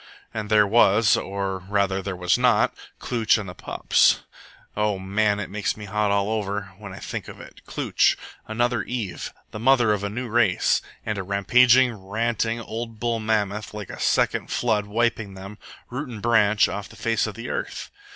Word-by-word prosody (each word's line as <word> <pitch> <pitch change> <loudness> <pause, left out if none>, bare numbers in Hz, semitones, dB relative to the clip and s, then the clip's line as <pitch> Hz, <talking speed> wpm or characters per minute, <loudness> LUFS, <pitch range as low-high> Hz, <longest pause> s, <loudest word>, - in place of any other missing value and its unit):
And 105 -1 -4
there 105 -1 +5
was 105 0 +4
or, 95 -1 -3
rather, 95 0 0
there 95 -1 -4
was 90 0 +2
not 125 -3 +3 0.3
Klooch 115 -3 +2
and 105 -3 -5
the 90 - -7
pups. - - +2 0.5
O 105 -1 0
man, 100 +2 0
it 105 - -4
makes 105 +1 -2
me 105 - -8
hot 105 +1 0
all 100 +1 +1
over 105 -2 -1
now - - -22
when 105 -2 -9
I 95 - -9
think - - -6
of - - -10
it - - -13
Klooch! - - +2 0.3
Another 120 +1 0
Eve! 110 -8 -4 0.2
The 105 - -6
mother 120 -2 +4
of 100 -1 -3
a 100 - -1
new 120 +4 -4
race! 110 -5 +2 0.2
And 105 -2 -2
a - - -3
rampaging, 125 +6 +4
ranting, 115 +3 -2
old 115 0 -6
bull 115 -1 0
mammoth, 105 -1 -1
like 105 -2 -6
a - - -9
second - - +1
flood, 110 -4 0
wiping 110 -2 -1
them, 100 +2 -10 0.3
root 130 +3 -4
and 115 -3 -7
branch, 105 -2 +3
off 100 0 -5
the - - -14
face 115 -1 0
of 105 - -6
the 115 +3 -7
earth! - - -4
105 Hz, 190 wpm, -24 LUFS, 100-115 Hz, 0.5 s, there